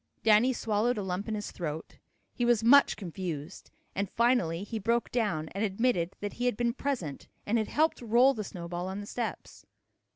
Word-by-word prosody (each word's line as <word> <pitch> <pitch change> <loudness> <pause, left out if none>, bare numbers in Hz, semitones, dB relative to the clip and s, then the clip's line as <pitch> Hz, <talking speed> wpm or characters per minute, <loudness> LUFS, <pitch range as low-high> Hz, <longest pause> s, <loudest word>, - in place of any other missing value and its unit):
Danny 220 +4 +5
swallowed 230 0 0
a 205 - -2
lump 190 +2 -3
in 220 - -2
his 210 -1 -5
throat. 160 -2 -6 0.3
He 245 - -2
was 235 -2 +3
much 280 +5 +6
confused, 175 -4 -6 0.2
and 200 -1 -2
finally 230 -8 +1
he 220 +2 -4
broke 230 +3 0
down 205 -10 0
and 200 +3 -3
admitted 195 -4 0
that 205 0 -3
he 245 +1 -1
had 245 - 0
been 235 -1 +1
present 250 - -3 0.2
and 230 +3 +1
had 215 - -1
helped 315 -1 +1
roll 240 +4 +5
the 215 -4 -4
snowball 175 -1 -5
on 190 +1 -4
the 205 - -6
steps. 230 +2 -5
210 Hz, 190 wpm, -29 LUFS, 185-240 Hz, 0.3 s, much